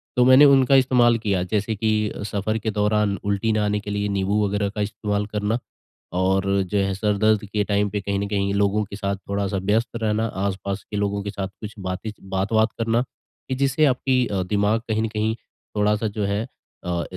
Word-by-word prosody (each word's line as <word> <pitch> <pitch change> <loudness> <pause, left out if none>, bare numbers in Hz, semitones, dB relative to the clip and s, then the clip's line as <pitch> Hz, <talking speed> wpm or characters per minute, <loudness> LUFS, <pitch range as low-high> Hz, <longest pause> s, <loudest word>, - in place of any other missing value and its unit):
तो 125 - +4
मैंने 130 +3 +8
उनका 135 -1 +5
इस्तेमाल 125 -3 +4
किया। 100 -5 0
जैसे 105 +3 -1
की 110 +1 0 0.4
सफ़र 105 +2 -1
के 110 0 -2
दौरान 105 -1 +1
उल्टी 100 +2 0
ना 110 -1 +1
आने 105 0 0
के 105 - -8
लिए 100 0 -1
नींबू 100 +1 +1
वग़ैरह 100 0 0
का 105 +1 -4
इस्तेमाल 105 0 -2
करना 105 +2 -1 0.6
और 95 +1 +2 0.2
जो 95 +3 -2
है 100 -1 +1
सर 105 +1 0
दर्द 110 0 +2
के 105 +1 -1
टाइम 100 0 +1
पे 105 0 -3
कहीं 100 0 -2
न 100 - -2
कहीं 100 -1 0
लोगों 100 +1 +2
के 100 - -9
साथ 100 -1 -2
थोड़ा-सा 100 0 -1
व्यस्त 105 +5 +1
रहना, 110 -1 0
आस-पास 100 -1 -3
के 105 - -2
लोगों 100 0 -1
के 100 - -4
साथ 95 -1 -4
कुछ 105 0 -6
बातें 95 +3 -4
च - - -15
बात-वात 100 +4 +1
करना, 115 +1 +1
कि 130 +1 -9
जिससे 140 +3 +2
आपकी 130 -1 +2
अ, 95 -2 -1
दिमाग 105 +3 +1
कहीं 110 0 +1
न - - 0
कहीं 110 0 -1 0.4
थोड़ा-सा 105 +1 +2
जो 105 0 -2
है 100 +2 -1 0.4
अ, 85 -1 -1
105 Hz, 205 wpm, -23 LUFS, 100-110 Hz, 0.6 s, मैंने